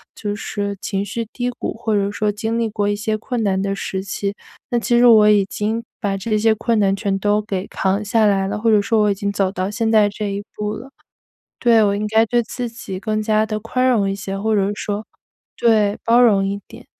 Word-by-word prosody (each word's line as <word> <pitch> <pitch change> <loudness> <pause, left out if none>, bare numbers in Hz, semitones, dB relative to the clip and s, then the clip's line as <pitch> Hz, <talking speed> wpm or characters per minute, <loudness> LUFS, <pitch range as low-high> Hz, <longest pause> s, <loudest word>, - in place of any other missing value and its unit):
就 205 -1 -4
是 200 0 -4
情 195 0 -2
绪 230 +3 -3
低 245 0 -2
谷， 240 - -5
或 225 -1 -2
者 200 -1 +1
说 210 0 0
经 220 +2 -3
历 230 -1 +1
过 205 -1 -1
一 205 - 0
些 215 +1 -2
困 225 +1 -3
难 190 -2 +1
的 195 0 -1
时 190 -1 -4
期。 200 0 -3 0.4
那 240 - +2
其 240 +1 +1
实 245 - +5
我 215 -3 +7
已 205 -2 +4
经 215 +4 -3 0.2
把 200 -3 -1
这 215 +2 -1
些 220 +1 +4
困 230 +1 0
难 195 -1 +2
全 200 -1 -1
都 205 +1 +2
给 195 -3 -4
扛 195 +2 -1
下 220 +1 +2
来 195 -2 +2
了， 210 +2 -3
或 225 +1 +2
者 210 -1 +5
说 220 +2 +1
我 210 - +3
已 - - +2
经 200 +1 -2
走 195 -2 0
到 185 0 -2
现 225 +1 -1
在 215 -2 +5
这 205 0 -4
一 200 +1 -4
步 210 0 -3
了。 250 +5 -9 0.7
对， 230 -2 +4
我 200 -1 +2
应 210 +1 -2
该 220 +1 +3
对 240 +2 +2
自 245 +1 -4
己 215 -5 -7
更 215 +1 -1
加 215 0 +2
地 215 -1 -3
宽 255 +4 0
容 215 -6 +2
一 195 - -1
些， 195 0 -5
或 220 +2 0
者 200 -1 +1
说 205 +1 -3 0.5
对， 215 -3 +2
包 235 +1 +4
容 200 -5 +4
一 200 +1 -3
点。 - - -13
210 Hz, 260 characters per minute, -20 LUFS, 200-225 Hz, 0.7 s, 我